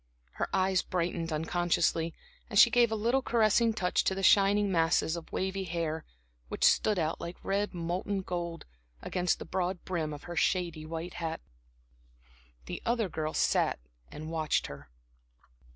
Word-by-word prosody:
Her - - -3
eyes 190 -1 +2
brightened 170 -2 -2
unconsciously, 165 0 0 0.3
and 205 - -2
she 230 +3 +8
gave 235 -1 +4
a - - +1
little 235 +5 +1
caressing 230 -1 +3
touch 180 -4 +1
to 190 - +1
the 195 - -4
shining 200 +1 +5
masses 165 -1 +2
of 170 -1 -8
wavy 190 +1 -2
hair 165 -2 -3 0.4
which - - -4
stood 210 -2 +4
out, 160 -1 -1
like 170 +1 -6
red 200 0 -1
molten 180 +4 -2
gold, 170 -2 -4 0.4
against 180 -1 0
the - - -8
broad 180 -1 -2
brim 165 -4 -2
of 145 -1 -8
her 175 - -7
shady 170 -4 0
white 165 +2 -5
hat. 165 -1 -4 1.3
The - - -6
other 230 -4 0
girl 155 -1 -3
sat - - +2 0.3
and 155 +2 -7
watched 160 -2 0
her. - - -9
175 Hz, 155 wpm, -30 LUFS, 165-195 Hz, 1.3 s, she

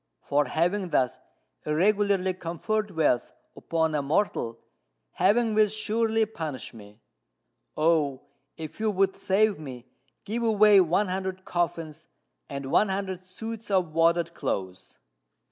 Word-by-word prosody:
For 145 +1 +1
having 175 +7 0
thus 130 -6 +1 0.4
irregularly 190 +3 +2
conferred 185 +5 -2
wealth 155 -9 +1 0.2
upon 160 -1 -1
a 150 - +1
mortal, 140 - 0 0.5
Heaven 220 +4 +2
will 215 0 +5
surely 220 +1 0
punish 160 -13 -6
me. 105 0 -14 0.8
Oh, 155 -4 +2 0.3
if 160 +2 -8
you 220 0 +1
would 195 -1 +1
save 200 0 +2
me, 130 -5 -8 0.4
give 225 +4 -3
away 210 -3 +6
one 185 +3 +1
hundred 190 0 -4
coffins 165 -3 -3 0.4
and 140 -1 -5
one 210 - +4
hundred 190 -1 -4
suits 225 +4 -7
of 185 -5 +1
wadded 170 +1 +2
clothes." 95 - -4
180 Hz, 125 wpm, -27 LUFS, 155-205 Hz, 0.8 s, away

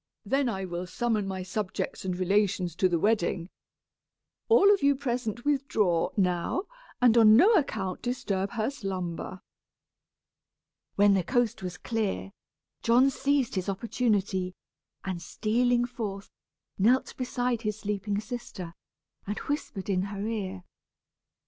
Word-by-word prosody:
"Then 270 -2 +1
I 190 -4 -3
will 175 0 -4
summon 215 +1 -1
my 190 -1 -4
subjects 190 0 -3
and 180 -1 -2
relations 185 -2 +1
to 185 - +3
the 175 - +2
wedding. 180 -2 0 1.0
All 410 -3 +7
of 400 - 0
you 280 0 +4
present 240 -3 -3
withdraw, 225 - +1
now, 180 - +1 0.4
and 245 -2 +5
on 215 -1 +8
no 400 - +6
account 220 - 0
disturb 210 -6 -2
her 225 +2 -1
slumber." 185 -5 -5 1.5
When 200 0 +5
the 190 -2 +2
coast 245 +1 0
was 180 -2 -5
clear, 215 -3 -2 0.5
John 250 +4 +4
seized 280 -2 +1
his 190 0 -2
opportunity, 195 -3 0 0.5
and 185 -3 -3
stealing 240 +5 +1
forth, 210 -5 -6 0.5
knelt 245 +7 +3
beside 245 -2 -1
his 215 -2 -2
sleeping 205 0 -2
sister, 210 -6 -7 0.5
and 205 - -3
whispered 260 -9 -4
in 190 -2 +1
her 200 0 -5
ear. 195 -4 -3
210 Hz, 130 wpm, -28 LUFS, 190-245 Hz, 1.5 s, on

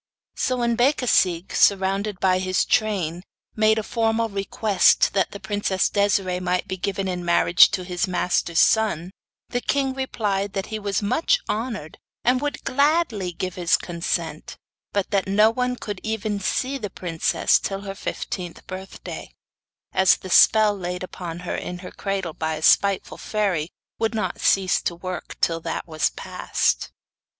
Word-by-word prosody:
So 255 - -1
when 235 -1 +1
Becasigue, 235 - +2
surround 195 +1 +2
by 185 -1 +3
his 185 0 +1
train, 190 -7 0 0.3
made 220 0 +3
a 220 - -1
formal 225 0 0
request 200 0 +2
that 190 -1 +1
the 200 - -9
princess 195 -1 0
Desiree 195 -3 +1
might 180 0 -1
be 190 - -3
given 195 +1 -2
in 180 -1 -3
marriage 170 0 +5
to 185 -2 -3
his 180 +1 -2
master's 180 -2 0
son, 190 -6 +2 0.4
the 245 - -2
king 270 0 0
replied 205 -7 -2
that 195 0 -2
he 215 - -2
was 200 -1 -2
much 255 - +2
honoured, 215 -8 -4 0.2
and 250 +1 +2
would 290 0 -3
gladly 280 - +1
give 185 +1 -4
his 175 -2 +2
consent; 170 -2 -4 0.3
but 200 0 -1
that 195 -2 +1
no 210 +3 +4
one 250 +1 -1
could 205 -5 -6
even 215 -2 -2
see 265 +8 -1
the 210 -4 -4
princess 170 -3 +1
till 195 0 -4
her 195 -1 -6
fifteenth 180 -2 -6
birthday, 190 +1 -8 0.6
as 190 -1 +5
the 185 - -9
spell 215 +1 +6
laid 180 -1 -4
upon 175 -2 -7
her 180 - -3
in 180 - -5
her - - -8
cradle 195 -4 -3
by 160 0 -2
a 155 - -7
spiteful 200 +3 +3
fairy, 190 -7 -1 0.3
would 225 0 0
not 215 - -2
cease 190 -1 +3
to 170 - -2
work 180 +1 -6
till 165 -1 +1
that - - -4
was 155 -2 0
past. - - -1
195 Hz, 160 wpm, -23 LUFS, 180-220 Hz, 0.6 s, spell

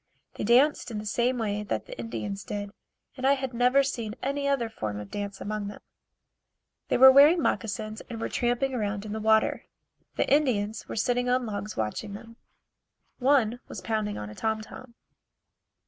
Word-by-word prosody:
They - - -5
danced 250 +6 +4
in 225 - -5
the 210 - -5
same 240 +4 +1
way 210 -3 -1
that 210 - -3
the - - -9
Indians 205 -3 -4
did, 205 -1 -5 0.4
and 260 0 -1
I 275 - +6
had 265 -2 -3
never 250 +3 +4
seen 230 -5 -3
any 280 +1 -1
other 275 -4 +1
form 110 - -5
of 105 -1 -9
dancing 200 -1 -5
among 210 0 -3
them. 205 - -8 1.1
They - - +1
were 265 +1 +10
wearing 290 +6 +7
moccasins 220 -6 -2
and 230 -2 -6
were - - -2
tramping 245 +3 0
around 210 -3 -2
in 210 - -5
the 220 - -3
water. 220 0 +2 0.5
The - - +1
Indians 225 -7 +1
were - - -6
sitting 245 +2 +1
on 250 0 +2
logs 210 -1 -5
watching 110 - -3
them. 230 +2 -12 0.8
One 250 -3 +3
was - - -7
pounding 215 -2 -2
on 105 0 -6
a - - -9
tom 220 - -1
tom. 235 +2 -12
225 Hz, 180 wpm, -27 LUFS, 210-255 Hz, 1.1 s, were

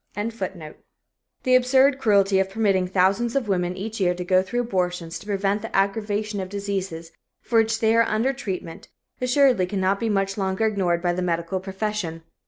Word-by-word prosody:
] - - -43 1.3
The 255 0 +4
absurd 260 +2 +4
cruelty 200 -5 +3
of 190 0 0
permitting 195 -3 +1
thousands 195 +6 +1
of 270 -5 0
women 180 -2 -1
each 220 +3 -5
year 180 -2 +2
to 180 0 -5
go 185 +1 +4
through 240 +6 -2
abortions 180 -6 -2
to - - -14
prevent 200 0 0
the 225 - -6
aggravation 205 +1 0
of 185 -1 -4
diseases 195 -5 -4 0.3
for 230 -2 +1
which 225 0 +1
they 220 0 +3
are 230 - +6
under 230 +4 +1
treatment 190 -10 -6 0.3
assuredly 250 -6 +3
cannot 190 0 0
be 230 - -1
much 195 0 0
longer 190 +2 0
ignored 185 -5 0
by 175 -1 +1
the 180 - -2
medical 170 +1 -1
profession. 190 -3 -4
195 Hz, 180 wpm, -23 LUFS, 185-225 Hz, 1.3 s, are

